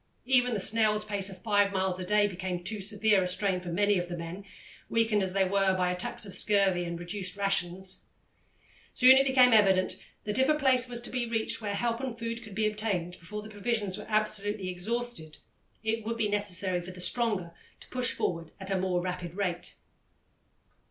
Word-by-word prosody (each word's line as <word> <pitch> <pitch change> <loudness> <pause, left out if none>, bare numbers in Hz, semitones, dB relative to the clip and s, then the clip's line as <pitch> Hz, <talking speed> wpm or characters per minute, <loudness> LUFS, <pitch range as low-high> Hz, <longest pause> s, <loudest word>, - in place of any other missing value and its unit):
Even 250 -2 +3
the - - -1
snail's 215 +1 +2
pace 200 -2 -1
of 185 -1 -12
five 205 -2 +3
miles 190 -1 -1
a - - -3
day 210 +3 +3
became 185 -2 -4
too 210 +2 -4
severe 205 0 +2
a 180 - 0
strain 185 0 +2
for 180 - -7
many 205 +3 +2
of 175 0 -4
the 175 - -4
men, 170 +4 -7 0.5
weakened 225 -2 +2
as 190 -1 -2
they 195 -1 +3
were 190 0 +2
by 180 -1 +1
attacks 180 +3 -3
of 195 - -9
scurvy 195 -4 +2
and 170 0 -5
reduced 185 +2 -4
rations. 190 -1 -1 0.9
Soon 260 +1 +8
it 270 +1 +4
became 255 -2 +5
evident 190 -3 +4 0.3
that 210 +3 0
if 265 +2 +3
a 305 - +4
place 260 -3 +4
were 245 - -6
to 240 0 -5
be 245 -2 -2
reached 225 0 -1
where 205 -2 -2
help 230 +2 -1
and 255 -3 -4
food 230 0 -4
could 215 -4 -11
be 215 +1 +1
obtained 200 -5 -2
before 210 +5 -7
the 215 - -10
provisions 210 -2 -1
were 210 - -9
absolutely 210 -2 0
exhausted, 200 -3 -4 0.5
it 220 0 -1
would 230 +2 -3
be 220 -2 +1
necessary 190 -3 0
for 175 - -9
the 180 -1 -10
stronger 205 -3 0 0.3
to - - -15
push 250 -1 0
forward 165 -2 -3
at 190 0 -7
a 190 - +1
more 180 -1 0
rapid 180 -2 -5
rate. 180 -3 -3
205 Hz, 200 wpm, -29 LUFS, 185-225 Hz, 0.9 s, Soon